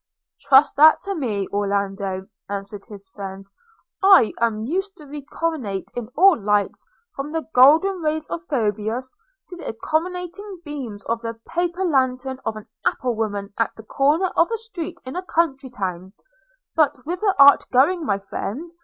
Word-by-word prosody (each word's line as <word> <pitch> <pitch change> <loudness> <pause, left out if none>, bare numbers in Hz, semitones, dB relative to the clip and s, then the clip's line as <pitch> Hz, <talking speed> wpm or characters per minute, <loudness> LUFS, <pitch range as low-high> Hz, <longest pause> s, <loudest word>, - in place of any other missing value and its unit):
'Trust 270 +2 +5
that 310 +2 +7
to 395 - -3
me, 220 - -2
Orlando.' 195 -1 -2 0.2
answered 200 0 -5
his 200 -2 -12
friend; 195 0 -8 0.6
'I 385 - +6
am 220 -2 0
used 385 - -3
to 300 - -13
reconnoitre 285 -7 -4
in 240 -3 -4
all 380 +1 +7
lights, 205 0 0 0.3
from 275 +2 -5
the 320 0 -3
golden 320 +9 +5
rays 310 0 -1
of 335 - -4
Phoebus 225 - -2 0.3
to 360 - -9
the - - -8
accommodating 360 - -3
beams 250 -9 -6
of 230 0 -2
the 230 -1 -5
paper 350 +2 -1
lantern 260 -3 0
of 220 - -2
an 215 - -10 0.2
apple 250 -1 0
woman 205 -3 -3
at 230 - 0
the 220 - -12
corner 295 - +1
of 335 - +3
a 455 - -1
street 440 -7 -5
in 255 - -7
a 360 - -2
country 305 -7 -1
town. 190 -4 -5 0.3
– - - -43
But 305 -4 +3
whither 365 +5 0
art 280 0 +7
going, 310 +8 +3
my 200 -9 0
friend? 220 - -6
270 Hz, 160 wpm, -22 LUFS, 210-335 Hz, 0.6 s, that